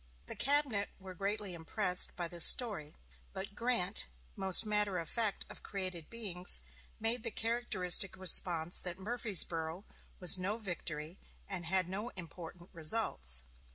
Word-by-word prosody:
The -, -, -4 dB
cabinet 275 Hz, -7 st, +1 dB
were 190 Hz, -1 st, -10 dB
greatly 200 Hz, +1 st, -3 dB
impressed 180 Hz, +2 st, +3 dB
by 175 Hz, -2 st, -3 dB
this 170 Hz, 0 st, +4 dB
story; 195 Hz, -11 st, +4 dB, 0.4 s
but 195 Hz, +1 st, -6 dB
Grant, 230 Hz, -, -2 dB, 0.3 s
most 190 Hz, +2 st, +5 dB
matter 210 Hz, -3 st, 0 dB
of 165 Hz, -2 st, -5 dB
fact 220 Hz, 0 st, -2 dB
of -, -, -12 dB
created 185 Hz, -5 st, -6 dB
beings, 185 Hz, -, +2 dB, 0.4 s
made 225 Hz, +2 st, 0 dB
the -, -, -4 dB
characteristic 205 Hz, -5 st, +1 dB
response 175 Hz, -2 st, +2 dB
that 180 Hz, -1 st, -5 dB
"Murfreesboro 190 Hz, -5 st, 0 dB, 0.3 s
was 180 Hz, 0 st, +3 dB
no 200 Hz, +4 st, -2 dB
victory, 170 Hz, -5 st, -5 dB, 0.3 s
and 175 Hz, -3 st, -5 dB
had 185 Hz, 0 st, +1 dB
no 205 Hz, +6 st, -5 dB
important 175 Hz, 0 st, -11 dB
results." 155 Hz, -, +1 dB
190 Hz, 135 wpm, -33 LUFS, 170-210 Hz, 0.4 s, most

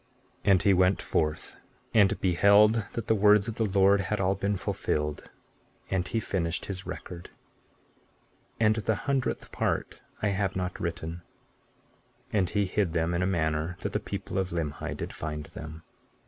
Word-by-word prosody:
And 100 Hz, -2 st, +4 dB
he 100 Hz, -2 st, +5 dB
went 95 Hz, +1 st, +3 dB
forth, 75 Hz, 0 st, -2 dB, 0.4 s
and 105 Hz, -1 st, +4 dB
beheld 100 Hz, +4 st, +5 dB
that 115 Hz, -2 st, -4 dB
the 110 Hz, -, +3 dB
words 105 Hz, 0 st, +5 dB
of 115 Hz, -, -2 dB
the 115 Hz, 0 st, 0 dB
Lord 100 Hz, 0 st, +4 dB
had 105 Hz, +3 st, -2 dB
all 95 Hz, 0 st, +2 dB
been 100 Hz, +1 st, -1 dB
fulfilled; 75 Hz, -4 st, -2 dB, 0.6 s
and 90 Hz, -2 st, 0 dB
he 115 Hz, -, -1 dB
finished 90 Hz, -5 st, -2 dB
his 95 Hz, -1 st, -6 dB
record; 85 Hz, -1 st, -7 dB, 1.3 s
(and 110 Hz, 0 st, +3 dB
the 110 Hz, 0 st, 0 dB
hundredth 135 Hz, -3 st, -1 dB
part -, -, -2 dB, 0.2 s
I 105 Hz, -, +3 dB
have 100 Hz, -1 st, -1 dB
not 90 Hz, -1 st, -3 dB
written) 85 Hz, 0 st, -4 dB, 1.1 s
and 95 Hz, -4 st, +2 dB
he 105 Hz, +1 st, +1 dB
hid 95 Hz, -2 st, 0 dB
them 85 Hz, 0 st, 0 dB
in 85 Hz, -, 0 dB
a 90 Hz, -, +1 dB
manner 80 Hz, -1 st, -1 dB
that -, -, -3 dB
the -, -, +1 dB
people 95 Hz, -, -4 dB
of 95 Hz, -1 st, -1 dB
Limhi 80 Hz, -4 st, -3 dB
did -, -, -5 dB
find 75 Hz, -1 st, -4 dB
them. 80 Hz, +2 st, -9 dB
95 Hz, 160 wpm, -28 LUFS, 85-105 Hz, 1.3 s, he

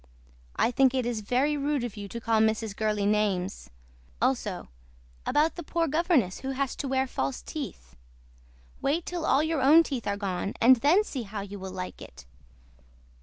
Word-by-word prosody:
I 235 Hz, -, +2 dB
THINK 265 Hz, 0 st, +3 dB
IT 255 Hz, -2 st, 0 dB
IS 235 Hz, -3 st, -2 dB
VERY 260 Hz, +8 st, +1 dB
RUDE 285 Hz, -2 st, -1 dB
OF 240 Hz, -4 st, -5 dB
YOU 205 Hz, -1 st, -7 dB
TOO 235 Hz, -, -6 dB
TO -, -, -21 dB
CALL 225 Hz, -1 st, +3 dB
MRS. 220 Hz, -1 st, 0 dB
GURLEY 210 Hz, -2 st, 0 dB
NAMES. 200 Hz, -, 0 dB, 0.5 s
ALSO -, -, -1 dB, 0.6 s
ABOUT 310 Hz, +2 st, +2 dB
THE -, -, -4 dB
POOR 335 Hz, +1 st, -1 dB
GOVERNESS 305 Hz, -, +1 dB
WHO 265 Hz, -, -5 dB
HAS 270 Hz, 0 st, -2 dB
TO 280 Hz, -, -4 dB
WEAR 265 Hz, 0 st, +1 dB
FALSE 135 Hz, -, -3 dB
TEETH. -, -, -7 dB, 0.9 s
WAIT 315 Hz, +5 st, 0 dB
TILL 345 Hz, -2 st, -3 dB
ALL 280 Hz, -, +4 dB
YOUR 315 Hz, -3 st, 0 dB
OWN 305 Hz, +5 st, +7 dB
TEETH 265 Hz, -7 st, -4 dB
ARE 200 Hz, 0 st, 0 dB
GONE 195 Hz, -1 st, -3 dB
AND 255 Hz, +2 st, +7 dB
THEN 310 Hz, -, +4 dB
SEE 275 Hz, -11 st, -5 dB
HOW 205 Hz, -2 st, -6 dB
YOU 200 Hz, 0 st, -8 dB
WILL 190 Hz, 0 st, -7 dB
LIKE 185 Hz, -1 st, -6 dB
IT. -, -, -12 dB
240 Hz, 185 wpm, -27 LUFS, 200-285 Hz, 0.9 s, OWN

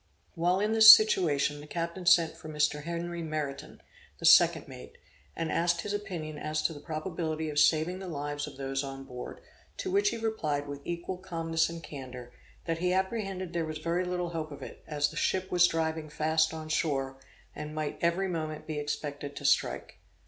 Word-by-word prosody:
While 180 Hz, +2 st, +1 dB
in 210 Hz, +2 st, +1 dB
this 220 Hz, -1 st, +9 dB
situation, 155 Hz, -10 st, +6 dB
the 150 Hz, -, -11 dB
captain 170 Hz, +2 st, -4 dB
sent 170 Hz, -3 st, +5 dB
for 155 Hz, -, -10 dB
Mr. 150 Hz, -1 st, 0 dB
Henry 170 Hz, 0 st, -4 dB
Meriton, 155 Hz, -3 st, -5 dB, 0.3 s
the -, -, -5 dB
second -, -, +6 dB
mate, -, -, -11 dB, 0.4 s
and 165 Hz, -1 st, -2 dB
asked 170 Hz, 0 st, +1 dB
his 205 Hz, -, -4 dB
opinion 175 Hz, -7 st, -5 dB
as 155 Hz, 0 st, -2 dB
to 165 Hz, -, +1 dB
the 145 Hz, -, -9 dB
probability 160 Hz, 0 st, -3 dB
of 145 Hz, -, 0 dB
saving 160 Hz, +4 st, +3 dB
the 190 Hz, -, -7 dB
lives 145 Hz, -2 st, -4 dB
of 140 Hz, -3 st, -10 dB
those 135 Hz, 0 st, -2 dB
on 135 Hz, 0 st, -7 dB
board; 125 Hz, -2 st, -8 dB, 0.4 s
to 375 Hz, -, -3 dB
which 405 Hz, +2 st, +3 dB
he -, -, -4 dB
replied 155 Hz, -11 st, -2 dB
with 140 Hz, 0 st, -7 dB
equal 175 Hz, +2 st, -4 dB
calmness 165 Hz, -3 st, -1 dB
and 165 Hz, -1 st, -8 dB
candor, 125 Hz, -3 st, -9 dB, 0.3 s
that 165 Hz, -1 st, -2 dB
he 180 Hz, +1 st, +1 dB
apprehended 190 Hz, -2 st, -2 dB
there 170 Hz, -1 st, 0 dB
was 155 Hz, -1 st, -4 dB
very 170 Hz, +3 st, -1 dB
little 180 Hz, -1 st, -2 dB
hope 160 Hz, -2 st, -4 dB
of 145 Hz, -, -8 dB
it, -, -, -10 dB
as 145 Hz, -2 st, 0 dB
the -, -, -12 dB
ship 190 Hz, 0 st, 0 dB
was 180 Hz, 0 st, +6 dB
driving 160 Hz, -1 st, -2 dB
fast 160 Hz, +1 st, +1 dB
on 160 Hz, -1 st, -7 dB
shore, 135 Hz, -4 st, -1 dB, 0.4 s
and 150 Hz, 0 st, -6 dB
might 155 Hz, -1 st, -3 dB
every 170 Hz, +3 st, +1 dB
moment 155 Hz, -3 st, -4 dB
be 155 Hz, -2 st, -3 dB
expected 145 Hz, -1 st, -4 dB
to 145 Hz, -, -7 dB
strike. 135 Hz, -, +1 dB
160 Hz, 190 wpm, -29 LUFS, 150-175 Hz, 0.4 s, this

